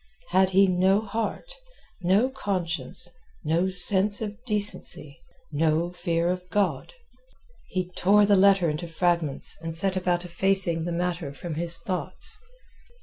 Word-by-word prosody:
—had 190 +1 +3
he 195 +1 +5
no 190 +2 +2
heart, 225 - -4 0.5
no 195 +7 +3
conscience, 185 -11 -1 0.4
no 170 +4 +1
sense 190 +2 +4
of 215 +1 -6
decency, 205 - -2 0.3
no 160 +3 0
fear 170 -1 -1
of 180 0 -3
God? 205 - -1 0.7
He 185 -1 -4
tore 205 +3 +4
the 205 0 +4
letter 195 -2 +4
into 155 +3 -3
fragments 165 -3 -1
and 165 0 -3
set 190 +2 +1
about 180 -1 -1
effacing 175 -2 +2
the 175 - -3
matter 170 -3 -3
from 165 +4 -7
his 165 +1 0
thoughts. 195 - -2
180 Hz, 135 wpm, -25 LUFS, 170-195 Hz, 0.7 s, he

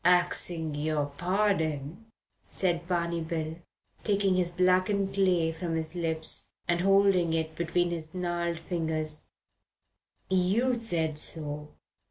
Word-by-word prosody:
"Axing 175 -2 +2
your 150 0 0
pardon," 175 -2 0 0.4
said 175 -2 0
Barney 170 -2 0
Bill, 160 0 -3 0.5
taking 200 -2 +2
his 180 -1 +1
blackened 185 +2 +2
clay 180 -4 +3
from 165 0 -3
his 160 0 +1
lips 160 -2 -1 0.2
and 175 0 +2
holding 195 -3 +4
it 160 -1 -2
between 175 +1 +1
his 160 0 -5
gnarled 175 -2 -1
fingers, 160 -3 -2 1.0
"you 190 +8 +2
said 165 -10 -1
so. 150 -1 -5
170 Hz, 115 wpm, -29 LUFS, 160-185 Hz, 1.0 s, holding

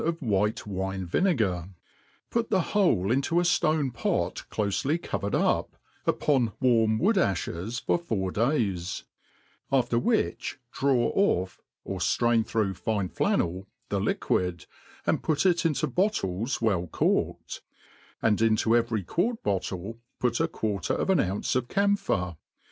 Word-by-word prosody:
3+3 - - -1
of 165 0 -1
white 110 - 0
wine 95 -1 -3
vinegar, 95 - +1 0.6
put 230 -1 0
the 190 -3 +3
whole 145 - +3
into 140 +7 +2
a - - +2
ftonepot 155 -7 0
clofely 110 - 0
covered 100 - -2
up, - - +1 0.3
upon 130 -7 +2
warm 115 -4 +3
wood 200 - +2
a(hes, 100 - -1
for - - +1
four 100 - -2
days; 105 - 0 0.7
after 120 -3 +2
which 220 - 0
draw 130 -3 +2
ofF 95 - +1 0.2
(or 95 - -5
ftrain 115 +6 +2
through 110 -3 0
fine 100 0 -2
flannel) 90 +3 0 0.2
the - - 0
liquid, 90 -2 -1 0.4
and - - +1
put 155 +3 0
it 175 -2 +3
into 155 -1 0
bottles 125 - -1
well 100 -6 +1
corked; - - -1 0.6
and 110 -1 +3
into 115 0 +3
every 115 -3 +1
quart 215 - -1
bottle 100 +2 -3 0.2
put 120 -1 +1
a 165 - +2
quarter 105 -10 -2
of - - 0
an 190 - +3
ounce 95 +6 -1
of 125 -1 0
camphor. 195 - 0
115 Hz, 135 wpm, -27 LUFS, 95-155 Hz, 0.7 s, the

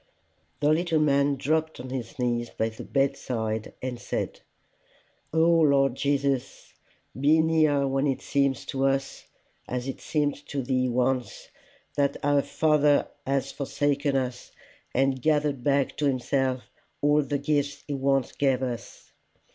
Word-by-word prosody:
The 145 - +3
little 165 -1 +1
man 140 -1 +3
dropped 160 +3 -1
on 125 +1 -7
his 130 +2 -5
knees 120 -2 -1
by 110 - -1
the 110 - -9
bedside, 120 -6 -1
and 125 -2 -3
said, - - -3 0.9
"O 160 - +2
Lord 140 -6 +4
Jesus, 140 -1 -1 0.4
be 145 +5 +4
near 155 -3 +3
when 135 +2 +1
it 135 - -1
seems 140 -2 0
to 135 0 0
us, 135 0 -2 0.4
as 125 +1 -3
it 135 - -5
seemed 145 -2 -1
to 140 -2 -3
thee 130 0 +1
once, 125 +1 -1 0.5
that 140 -1 +1
our 145 0 +3
Father 150 -1 +2 0.2
has 135 0 0
forsaken 140 0 -1
us, 125 -2 -3 0.4
and 135 0 +1
gathered 150 -3 +1
back 140 0 +1
to 150 - +1
himself 130 0 0 0.4
all 145 +1 +4
the 145 0 -2
gifts 145 0 -1
he 145 - -3
once 135 -1 +1
gave 135 -2 +1
us. 120 -2 -6
140 Hz, 140 wpm, -26 LUFS, 130-145 Hz, 0.9 s, Lord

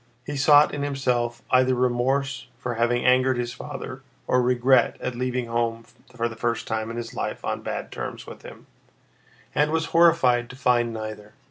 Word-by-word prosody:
He 145 - -5
sought 145 +2 +5
in 145 - -3
himself 125 -4 -1
either 130 0 +4
remorse 125 +1 0
for 120 - -4
having 120 +1 0
angered 130 0 +4
his 120 -1 -3
father - - -7 0.2
or 125 - +2
regret 125 +1 +3
at 125 - -3
leaving 125 0 -2
home 115 0 -2 0.3
for 115 -1 0
the 115 - -8
first 115 0 -2
time 110 0 -3
in 115 - -6
his 115 -1 -6
life - - -4
on - - -2
bad - - -5
terms - - -6
with - - -11
him, - - -12 0.9
and 150 +1 +2
was 160 +1 0
horrified 150 -8 +4
to - - -10
find 125 -2 +2
neither. 110 -1 -7
125 Hz, 175 wpm, -24 LUFS, 120-130 Hz, 0.9 s, sought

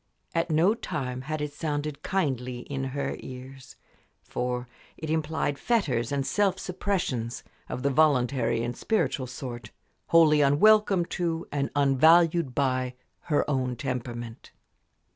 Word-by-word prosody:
At 165 0 0
no 165 +6 +4
time 130 - -4
had 155 +3 -4
it 150 -1 -3
sounded 150 -2 -3
kindly 130 -10 -1
in 135 0 -4
her 140 +2 -3
ears; 130 0 -10 0.5
for 125 0 -3 0.3
it 155 -1 -4
implied 155 -2 -1
fetters 140 - 0
and 140 -1 0
self 195 +1 +1
suppressions 175 - -2 0.3
of 125 - -4
the 140 - +2
voluntary 135 -5 +2
and 120 0 -3
spiritual 140 - 0
sort 120 -3 -7 0.4
wholly 155 -3 +5
unwelcome 195 +6 +5 0.2
to 165 -1 -1
and 140 -1 -1
unvalued 160 +1 +4
by 130 -2 0 0.3
her 150 -3 +1
own 130 -3 0
temperament. 120 -3 -5
140 Hz, 125 wpm, -27 LUFS, 125-160 Hz, 0.5 s, wholly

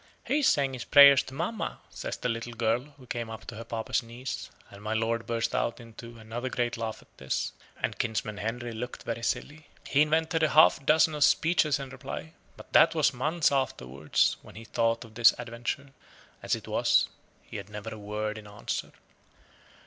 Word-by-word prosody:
"He 295 - +1
is 285 - +3
saying 140 -2 +2
his 125 - -5
prayers 140 -1 +8
to 130 - -10
mamma," 175 +9 -3
says - - -5
the - - -2
little 115 0 -3
girl, 115 +2 +1
who 130 - -15
came 120 -2 -4
up 110 -1 -8
to 115 - -8
her 115 - -6
papa's 115 -1 -1
knees; 120 +2 -6 0.2
and 100 - -12
my 105 +1 -2
lord 115 +1 -1
burst 115 -1 -1
out 115 - -1
into 115 0 -11
another 115 +3 -5
great 120 -1 -1
laugh 115 -1 -5
at - - -32
this, 65 0 -2 0.3
and - - -2
kinsman 110 -2 -2
Henry 120 +3 -3
looked 120 +2 -6
very 115 0 -4
silly. 150 +6 -3 0.2
He 145 - +3
invented 160 +2 +2
a 155 - +4
half 155 -2 +6
dozen 155 +1 +5
of 150 -1 +2
speeches 160 -2 +3
in 135 -1 -7
reply, 135 +4 -7 0.2
but - - -14 0.2
'twas 155 -3 +2
months 150 +6 +1
afterwards 75 - 0
when - - -15
he 110 - -9
thought 115 +1 0
of 110 - -16
this 115 +1 +6
adventure: 120 +4 -5 0.5
as - - 0
it - - -10
was, - - +3 0.4
he - - -8
had 100 - -8
never 105 +1 -7
a 110 - -9
word 105 +1 -3
in 105 - -13
answer. 105 0 -5
120 Hz, 195 wpm, -28 LUFS, 110-140 Hz, 0.5 s, prayers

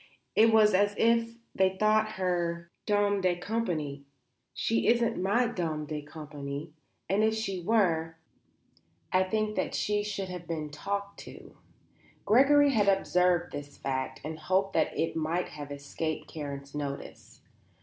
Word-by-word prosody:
It 225 +1 +6
was 215 -2 +5
as 205 +2 +3
if 230 0 +2 0.2
they 190 0 +2
thought 215 +1 +3
her 170 -2 -2 0.2
my 205 - +4
dame 205 -1 +2
de 180 -1 +2
compagnie. 175 -8 -3 0.5
She 225 - 0
isn't 235 -3 +2
my 205 +6 +2
dame 165 -9 -2
de 150 0 -4
compagnie; 150 0 -7 0.3
and 195 +4 +2
if 220 0 +3
she 195 -4 -3
were, 170 -5 +1 0.9
I 185 - +4
think 215 +3 0
that - - -1
she 210 0 +1
should 200 -2 -4
have 180 -2 -7
been 155 -3 -4
talked 200 +6 -4
to." - - -12 0.7
Gregory 280 +5 +5
had 210 -5 +2
observed 180 -2 +2
this 145 0 -8
fact 130 -1 -3
and 155 +1 -5
had 155 - -15
hoped 190 +1 +2
that - - +1
it 165 - 0
might 165 +3 -1
have 145 -1 -8
escaped 150 +2 -4
Karen's 140 -2 -7
notice. 140 -1 -6
180 Hz, 150 wpm, -29 LUFS, 155-210 Hz, 0.9 s, It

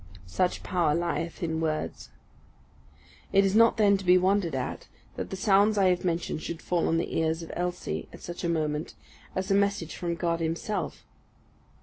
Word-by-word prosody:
Such 180 - -1
power 170 -5 +1
lieth 170 0 -2
in 160 -1 -1
words. 155 -1 -3 1.2
It 195 0 +5
is 195 +1 +1
not 230 +1 +6
then 205 -2 +5
to 195 - -8
be 180 0 +6
wondered 185 -4 +2
at, 130 - -4 0.3
that - - -4
the - - -4
sounds 205 +2 +3
I 190 -2 +5
have 180 -1 +1
mentioned 170 -3 -1
should 165 0 -5
fall 175 -2 0
on 165 - +2
the 165 - -1
ears 160 +1 0
of 165 - -8
Elsie, 180 0 -3
at - - -12
such 175 +1 -6
a 170 - 0
moment, 155 -2 -1 0.4
as 190 +1 -2
a - - +5
message 200 -4 +1
from 170 -1 -2
God 170 -1 -1
Himself. 165 +2 -3
175 Hz, 185 wpm, -28 LUFS, 165-195 Hz, 1.2 s, not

